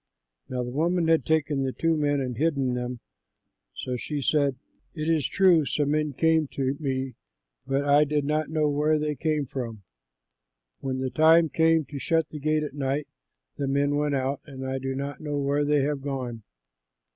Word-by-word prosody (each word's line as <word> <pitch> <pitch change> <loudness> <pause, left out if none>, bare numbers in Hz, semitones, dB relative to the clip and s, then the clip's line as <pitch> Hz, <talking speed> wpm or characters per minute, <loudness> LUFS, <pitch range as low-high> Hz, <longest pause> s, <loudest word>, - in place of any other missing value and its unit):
Now 125 -1 -2
the 125 - -5
woman 165 +4 +1
had 160 -7 +3
taken 150 -3 +1
the 135 -1 0
two 165 0 +1
men 145 -2 +1
and 125 -2 -3
hidden 140 -2 +1
them; 125 -1 -4 0.7
so 125 -1 -3
she 150 +4 -4
said, 140 -1 +2 0.4
"It 155 -1 -3
is 160 -4 +2
true, 185 -5 +4
some 145 0 0
men 150 -1 0
came 160 +1 +2
to 135 0 -1
me, 130 -3 -2 0.5
but 135 +1 0
I 145 +1 +5
did 150 -1 0
not 155 +1 0
know 155 -1 +1
where 150 +2 +2
they 150 0 -1
came 150 0 -1
from. 120 -6 -6 1.0
When 130 -1 -3
the 130 -1 -2
time 160 +1 +5
came 160 -1 +3
to 140 0 -7
shut 160 +2 +1
the 150 - -7
gate 155 +1 +1
at 150 - -5
night, 140 +1 -2 0.5
the 140 - -2
men 140 +1 +1
went 145 -1 +1
out 135 +1 -1
and 135 -2 -8
I 130 0 -2
do 135 0 -3
not 140 0 -5
know 150 -2 -3
where 140 +1 +1
they 145 0 +2
have 145 -1 -1
gone. 130 -5 -4
145 Hz, 190 wpm, -26 LUFS, 135-155 Hz, 1.0 s, I